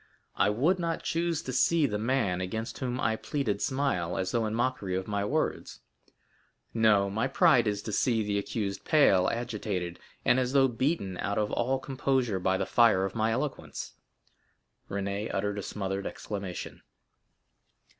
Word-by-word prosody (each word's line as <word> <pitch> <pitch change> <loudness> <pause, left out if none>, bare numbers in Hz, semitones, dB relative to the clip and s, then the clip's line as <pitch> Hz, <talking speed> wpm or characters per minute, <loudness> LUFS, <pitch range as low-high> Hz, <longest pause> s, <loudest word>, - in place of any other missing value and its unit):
I 100 - +3
would 150 - +2
not 165 -1 -2
choose 170 -1 -1
to 130 - -5
see 155 +5 +3
the 105 -6 -1
man 110 -6 0
against 110 +5 -4
whom 125 -1 -2
I 110 -1 +1
pleaded 110 -5 -2
smile, 130 -11 0
as 95 0 -1
though 115 -2 +1
in 110 - -3
mockery 120 -6 -1
of 95 0 -3
my 100 -1 -1
words. 105 - -2 0.9
No; 110 -3 +4
my 110 +6 -1
pride 130 -3 +4
is 105 -1 -1
to 110 - -4
see 115 +1 +1
the 100 -1 0
accused 100 -1 -3
pale, 100 - +4
agitated, 105 -7 -3 0.3
and 125 +1 +4
as 125 0 -1
though 135 -1 +5
beaten 120 - -1
out 100 - -1
of 105 -1 0
all 130 +3 +1
composure 130 -5 0
by 95 +1 +1
the - - -1
fire 115 -5 +4
of 95 - -4
my 110 0 +1
eloquence." 130 +4 -4 1.0
Renée 100 +1 -3
uttered 105 +1 -1
a - - -3
smothered 95 0 -3
exclamation. 95 -3 -6
110 Hz, 165 wpm, -29 LUFS, 100-130 Hz, 1.0 s, though